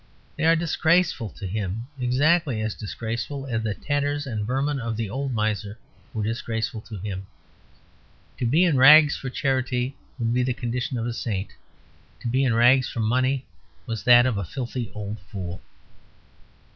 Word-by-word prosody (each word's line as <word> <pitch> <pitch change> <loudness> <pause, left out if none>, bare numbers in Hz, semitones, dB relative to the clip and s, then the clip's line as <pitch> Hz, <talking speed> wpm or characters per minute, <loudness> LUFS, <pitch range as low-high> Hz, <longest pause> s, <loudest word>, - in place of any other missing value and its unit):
They 160 - -1
are 165 +1 +6
disgraceful 165 - +1
to 100 - -6
him: 100 +3 -3
exactly 140 +1 +2
as 110 0 -2
disgraceful 115 +6 -5
as 115 -4 -2
the 110 -2 -2
tatters 145 0 -1
and 110 -5 -3
vermin 135 +3 0
of 115 -2 -3
the 110 -3 -3
old 135 +3 -2
miser 105 -2 -1 0.3
were 110 - -3
disgraceful 115 0 -2
to 110 - -6
him. 95 0 -5 1.1
To 120 - 0
be 155 +9 +4
in 165 -6 +3
rags 150 +3 +8
for 135 - -5
charity 130 -1 -1 0.2
would 115 -2 0
be 125 - +2
the 125 -1 0
condition 125 +2 -3
of 115 - -2
a 120 - -2
saint; 105 -5 -3 0.7
to - - -4
be 130 +3 +2
in 125 -4 +2
rags 125 +2 +5
for - - -5
money 130 +4 +1 0.4
was 115 -5 -4
that 120 0 +8
of 120 -6 0
a - - -2
filthy 120 - -5
old 105 0 -5
fool. 90 -1 -7
120 Hz, 170 wpm, -25 LUFS, 110-135 Hz, 1.1 s, rags